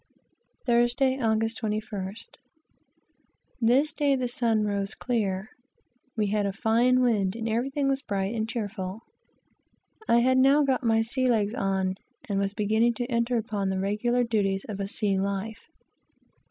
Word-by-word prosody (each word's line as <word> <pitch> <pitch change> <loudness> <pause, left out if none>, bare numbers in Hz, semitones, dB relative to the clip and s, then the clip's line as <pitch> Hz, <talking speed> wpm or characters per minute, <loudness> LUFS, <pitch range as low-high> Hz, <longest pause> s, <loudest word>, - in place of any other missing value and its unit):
Thursday, 240 +2 +2
Aug. 225 -3 +1
21st. 215 -2 -4 1.3
This 265 +6 +3
day 285 -2 +2
the 255 -1 -1
sun 230 -3 +1
rose 200 0 -2
clear, 210 -5 -2 0.7
we 215 - +2
had 205 -1 +1
a - - -1
fine 235 +4 +2
wind, 210 -6 +1
and 230 0 -4
everything 270 +5 -1
was 270 0 0
bright 200 -4 -2
and 220 -1 -2
cheerful. 205 -3 -4 1.1
I 235 0 +4
had 260 +1 +3
now 275 +3 +5
got 265 -2 0
my 225 -1 +3
sea 255 +3 0
legs 215 -3 +1
on, 190 -3 -1 0.3
and 200 -2 -1
was 200 0 -1
beginning 220 +3 +2
to 245 - -2
enter 235 +1 +1
upon 205 -3 -2
the 190 - -1
regular 210 +6 0
duties 200 -4 0
of 200 -2 -6
a 195 - -2
sea 200 -1 0
life. 200 +5 -4
225 Hz, 150 wpm, -27 LUFS, 200-245 Hz, 1.3 s, now